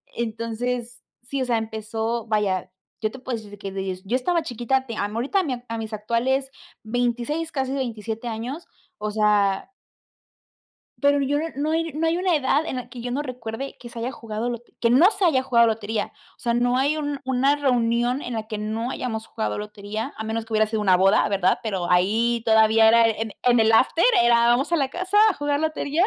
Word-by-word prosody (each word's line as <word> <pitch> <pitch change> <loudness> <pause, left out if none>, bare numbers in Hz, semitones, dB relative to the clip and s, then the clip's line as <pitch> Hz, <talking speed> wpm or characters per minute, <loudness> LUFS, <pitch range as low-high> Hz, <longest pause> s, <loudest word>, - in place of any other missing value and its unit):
entonces, 235 +2 -3 0.2
sí, 270 +3 -4
o - - 0
sea, 240 -2 +1
empezó 220 +1 -3
vaya, 195 -4 0 0.3
yo 215 - +1
te 260 - -10
puedo 255 -2 -3
decir 205 -1 -11
que 195 -1 -6
des 190 -1 -4
yo 235 +6 0
estaba 335 +7 +1
chiquita, 255 0 -1
te 230 -3 -6
a - - 0
ahorita 240 - 0 0.3
a 230 - -3
mis 220 0 -6
actuales 245 +5 0 0.3
26, 245 +8 -1
casi 265 -1 -2
27 230 -3 -4
años, 240 +8 -5 0.3
o 210 0 -3
sea 210 - +1 1.3
pero 285 0 +4
yo 285 +2 +1
no 315 - -1
no 295 +3 -1
hay 325 -2 -1
no 320 +2 0
hay 330 +1 +1
una 365 -1 +2
edad 290 +2 +1
en 265 - -4
la 250 -1 -6
que 245 0 -9
yo 245 +1 -4
no 275 +4 -1
recuerde 250 -1 -6
que 240 - -10
se 235 0 -8
haya 245 +3 -2
jugado 230 -1 -4
lo 240 - -3
que - - -31
que 230 - +2
no 310 - +6
se 390 -3 +1
haya 265 -6 +3
jugado 235 -3 +4
lotería. 220 -1 -2 0.3
O - - -48
sea, 235 - 0
no 245 +1 +2
hay 285 +4 +1
un 290 -2 -3
una 265 +2 +2
reunión 245 -1 +1
en 245 - -5
la 220 -1 -4
que 220 -1 -4
no 220 +3 -3
hayamos 225 -4 -4
jugado 220 - -3
lotería, 210 +4 -5
a 220 - -4
menos 220 0 -3
que 225 - -8
hubiera 215 0 +4
sido 215 0 -2
una 185 -3 +4
boda, 195 +2 +4
¿verdad? 190 -2 +2
Pero, 190 -6 -2
ahí 225 +6 +2
todavía 220 0 +5
era 230 +1 +6
en 220 -1 -2
en 245 -2 +4
el 220 0 +4
after 265 +8 +4 0.2
era 235 0 +5
vamos 255 +7 +2
a - - +4
la 275 -2 0
casa 370 +6 -1
a - - 0
jugar 290 0 -1
lotería. 315 +1 0
235 Hz, 210 wpm, -23 LUFS, 220-270 Hz, 1.3 s, no